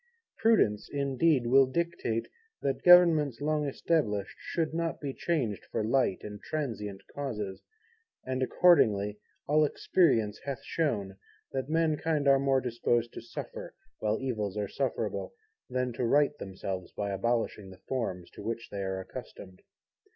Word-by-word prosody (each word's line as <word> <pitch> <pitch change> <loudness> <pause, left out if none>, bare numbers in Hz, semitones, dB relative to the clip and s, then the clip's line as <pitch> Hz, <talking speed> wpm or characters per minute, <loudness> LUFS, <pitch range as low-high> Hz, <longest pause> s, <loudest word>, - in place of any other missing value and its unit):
Prudence, 215 - +3
indeed, 140 -1 +2
will 135 +2 +6
dictate 150 -7 -1 0.4
that 135 - -1
Governments 165 -8 +6
long 150 0 0
established 130 -9 0
should 160 -2 -2
not 165 0 -2
be 140 -2 -4
changed 130 - -1
for 110 - -1
light 115 -3 +1
and 105 -1 -8
transient 105 -10 -4
causes; 105 -9 -4 0.6
and 130 0 -2
accordingly 105 - +4 0.3
all 155 +1 +4
experience 130 - +2
hath 140 -3 -5
shown, 105 -12 -1 0.3
that 135 +1 -3
mankind 155 -2 +1
are 135 -1 +6
more 135 -1 +2
disposed 120 -1 0
to - - -7
suffer, - - -8 0.2
while 110 0 0
evils 110 -6 -2
are 105 -1 -1
sufferable, 135 - -3 0.3
than 125 -1 -1
to 120 - -3
right 145 +4 +3
themselves 95 -1 -5
by 100 -1 -3
abolishing 110 -1 -1
the 95 0 -14
forms 95 -9 -3
to - - -11
which 115 +2 -4
they 100 - -4
are 95 0 -2
accustomed. 95 0 -10
130 Hz, 140 wpm, -30 LUFS, 105-150 Hz, 0.6 s, will